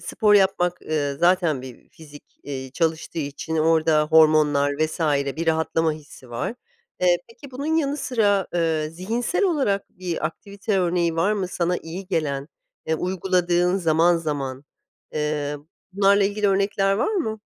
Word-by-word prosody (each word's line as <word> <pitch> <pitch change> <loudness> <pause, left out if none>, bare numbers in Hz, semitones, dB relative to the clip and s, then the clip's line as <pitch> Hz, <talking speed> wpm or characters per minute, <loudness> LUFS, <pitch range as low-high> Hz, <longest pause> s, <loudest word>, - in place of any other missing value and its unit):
Spor 210 -2 +2
yapmak, 185 -3 +2
ııı, 145 -3 -2
zaten 170 -6 +2
bir 130 -2 -12
fizik, 150 -2 -14 0.2
eee, 130 -2 -6
çalıştığı 160 +2 -2
için 150 +2 -4
orada 160 -1 +3
hormonlar 155 -2 +4
vs. 155 +2 -1 0.4
bir 165 +1 -3
rahatlama 160 0 +1
hissi 145 -5 -13
var. 120 - -3 0.5
Eee, 175 -1 +4
peki 270 +4 -14
bunun 285 +5 -2
yanı 290 -2 0
sıra, 205 -8 +1
ııı, 160 -2 0
zihinsel 230 - -1
olarak 270 - 0
bir 175 -4 -3
aktivite 200 +4 -4
örneği 170 -2 +1
var 195 +6 +2
mı 195 -4 -2
sana 180 0 -1
iyi 180 +4 -8
gelen, 150 -5 -2 0.4
eee, 160 - +1
uyguladığın 180 0 +1
zaman 170 0 +3
zaman? 140 -4 -4 0.5
Eee, 150 -1 -2 0.4
bunlarla 200 +1 +4
ilgili 205 +1 0
örnekler 195 0 +1
var 225 - 0
mı? 220 - -2
170 Hz, 145 wpm, -23 LUFS, 155-195 Hz, 0.5 s, hormonlar